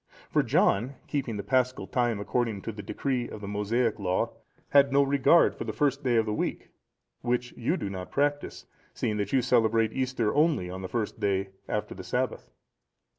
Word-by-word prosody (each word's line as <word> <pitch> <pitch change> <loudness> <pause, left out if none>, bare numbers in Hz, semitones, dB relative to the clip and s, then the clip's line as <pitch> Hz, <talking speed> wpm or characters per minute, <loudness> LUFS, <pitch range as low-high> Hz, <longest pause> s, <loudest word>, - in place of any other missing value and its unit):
For - - +4
John, 120 +8 +2
keeping 130 -7 -2
the 100 - -4
Paschal 130 -5 +1
time 120 +1 0
according 110 0 -1
to 115 - -3
the 105 -1 -8
decree 125 +4 -2
of - - -8
the 100 - -7
Mosaic 110 +3 0
Law, 90 -2 0 0.4
had 140 -1 +5
no 140 +1 +5
regard 140 +4 +4
to - - -2
the - - -4
first 140 -1 0
day 125 -2 +2
of 115 -1 +3
the 105 - -2
week, - - -3 0.5
which 125 0 -1
you 140 +10 0
do - - -3
not 95 -2 -6
practise, 145 +1 -1 0.3
seeing 105 - -1
that 100 -1 -2
you 130 -2 +3
celebrate 115 -2 +3
Easter 130 -4 0
only 145 - +2
on 95 +1 -6
the 95 - -5
first 115 -3 -3
day 95 -1 0 0.2
after - - -2
the - - -9
Sabbath. - - -2
120 Hz, 190 wpm, -28 LUFS, 105-135 Hz, 0.5 s, had